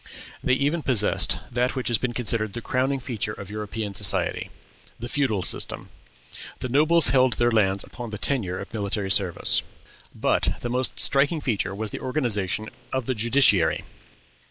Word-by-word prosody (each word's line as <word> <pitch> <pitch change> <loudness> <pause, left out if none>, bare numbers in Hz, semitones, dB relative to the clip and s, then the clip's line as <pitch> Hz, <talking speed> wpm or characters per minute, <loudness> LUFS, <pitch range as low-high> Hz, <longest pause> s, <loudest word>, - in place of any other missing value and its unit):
They 130 - +3
even 145 +5 0
possessed 115 -8 +2
that 125 +2 0
which 130 - -2
has 120 -3 +2
been 120 -2 -2
considered 110 -3 0
the 120 - -5
crowning 130 +3 0
feature 115 -5 -3
of 100 -1 -9
European 105 0 -5
society, 95 - +1 0.5
the 120 - -5
feudal 120 -9 0
system. - - -3 0.7
The 125 - -4
nobles 155 +3 +4
held 130 0 +4
their 120 0 +2
lands 100 -3 +2
upon 120 -2 -6
the 105 - -6
tenure 105 -6 0
of - - -8
military 100 -2 -2
service. 95 -3 +3 0.5
But - - +1
the 120 - -3
most 125 +1 0
striking 145 +4 +3
feature 100 -8 -2
was 105 0 -2
the - - -5
organization 110 - 0 0.2
of 130 -2 -2
the 130 - 0
judiciary. 115 -6 +3
120 Hz, 160 wpm, -24 LUFS, 105-130 Hz, 0.7 s, nobles